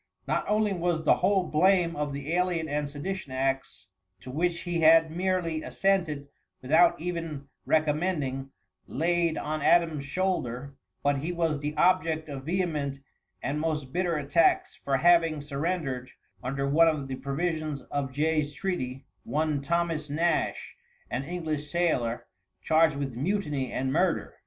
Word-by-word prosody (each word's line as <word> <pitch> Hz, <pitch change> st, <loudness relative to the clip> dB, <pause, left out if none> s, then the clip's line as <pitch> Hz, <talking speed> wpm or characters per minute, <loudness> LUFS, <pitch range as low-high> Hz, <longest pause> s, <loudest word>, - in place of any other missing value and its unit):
Not -, -, 0 dB
only 210 Hz, -1 st, +2 dB
was 170 Hz, -2 st, -1 dB
the -, -, +5 dB
whole 190 Hz, +1 st, +2 dB
blame 175 Hz, +1 st, +3 dB
of 145 Hz, -1 st, -2 dB
the 140 Hz, +3 st, -4 dB
alien 175 Hz, -2 st, +1 dB
and 145 Hz, -1 st, -2 dB
sedition 145 Hz, +1 st, -5 dB
acts, 135 Hz, 0 st, -2 dB, 0.4 s
to 130 Hz, -, -8 dB
which 170 Hz, +4 st, 0 dB
he 175 Hz, -1 st, -2 dB
had 160 Hz, 0 st, +6 dB
merely 180 Hz, -3 st, 0 dB
assented 170 Hz, -9 st, 0 dB, 0.3 s
without 160 Hz, +7 st, +4 dB
even 165 Hz, -4 st, -4 dB, 0.2 s
recommending, 150 Hz, -4 st, 0 dB, 0.4 s
laid 170 Hz, +2 st, +1 dB
on 155 Hz, +1 st, -3 dB
Adams' 160 Hz, -3 st, +3 dB
shoulders, 140 Hz, -6 st, -2 dB, 0.3 s
but 145 Hz, -1 st, +2 dB
he 160 Hz, +5 st, -3 dB
was 165 Hz, -4 st, 0 dB
the 150 Hz, +1 st, -4 dB
object 165 Hz, -4 st, +2 dB
of 135 Hz, -2 st, -6 dB
vehement 155 Hz, -6 st, -1 dB, 0.5 s
and 145 Hz, +2 st, -1 dB
most 150 Hz, -4 st, -2 dB
bitter 180 Hz, -2 st, 0 dB
attacks 150 Hz, +3 st, +2 dB
for 135 Hz, -1 st, -1 dB
having 165 Hz, -1 st, +4 dB
surrendered, 145 Hz, -3 st, -3 dB, 0.3 s
under 135 Hz, +2 st, -2 dB
one 160 Hz, +4 st, +5 dB
of 150 Hz, -4 st, 0 dB
the 130 Hz, -1 st, -4 dB
provisions 155 Hz, +1 st, -2 dB
of 140 Hz, -2 st, -3 dB
Jay's 150 Hz, +1 st, 0 dB
treaty, 135 Hz, -7 st, -3 dB, 0.2 s
one 150 Hz, -1 st, 0 dB
Thomas 165 Hz, 0 st, -1 dB
Nash, 165 Hz, +3 st, 0 dB, 0.4 s
an 130 Hz, +3 st, -2 dB
English 155 Hz, -3 st, -3 dB
sailor, 130 Hz, -10 st, 0 dB, 0.4 s
charged 160 Hz, -1 st, +4 dB
with 140 Hz, -2 st, -3 dB
mutiny 145 Hz, -, -1 dB
and 130 Hz, 0 st, -1 dB
murder. 175 Hz, +2 st, +1 dB
155 Hz, 140 wpm, -28 LUFS, 140-175 Hz, 0.5 s, had